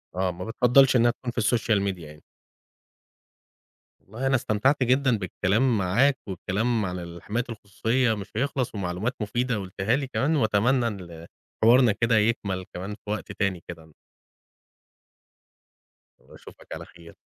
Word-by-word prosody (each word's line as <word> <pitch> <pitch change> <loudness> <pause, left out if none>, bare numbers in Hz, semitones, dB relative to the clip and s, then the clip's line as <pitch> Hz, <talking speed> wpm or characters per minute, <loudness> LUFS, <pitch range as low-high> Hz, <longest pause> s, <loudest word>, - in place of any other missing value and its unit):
آه، 95 0 0
ما 90 +1 -7
بتفَضّلش 125 +3 +4
إنها 120 0 +5
تكون 125 0 -6
في 120 - -26
السوشيال 110 -2 +2
ميديا 95 -5 -3
يعني. 75 0 -14 1.8
والله 115 +7 -5
أنا 135 - +3
استمتعت 130 +4 +1
جدًا 130 -1 +2
بالكلام 105 +5 +1
معاك، 120 +9 +2
والكلام 105 +4 -1
على 90 -1 -4
الحماية 85 +7 -4
الخصوصيّة 115 +3 0
مش 100 -3 -7
هيخلص، 130 -1 -1
ومعلومات 95 +5 -2
مفيدة 120 +3 -1
قُلتها 95 +4 -1
لي 140 -1 -2
كمان، 145 +4 0
وأتمنى 120 +1 +2
إن 85 -6 -8 0.4
حوارنا 120 +1 +6
كده 115 +2 +2
يكمل 105 -4 0
كمان 95 +4 -5
في 105 - -14
وقت 105 - -4
تاني 95 -4 -2
كده. 80 -2 -10 2.3
وأشوفك - - -16
على - - -7
خير. 85 -1 -16
110 Hz, 135 wpm, -25 LUFS, 95-125 Hz, 2.3 s, حوارنا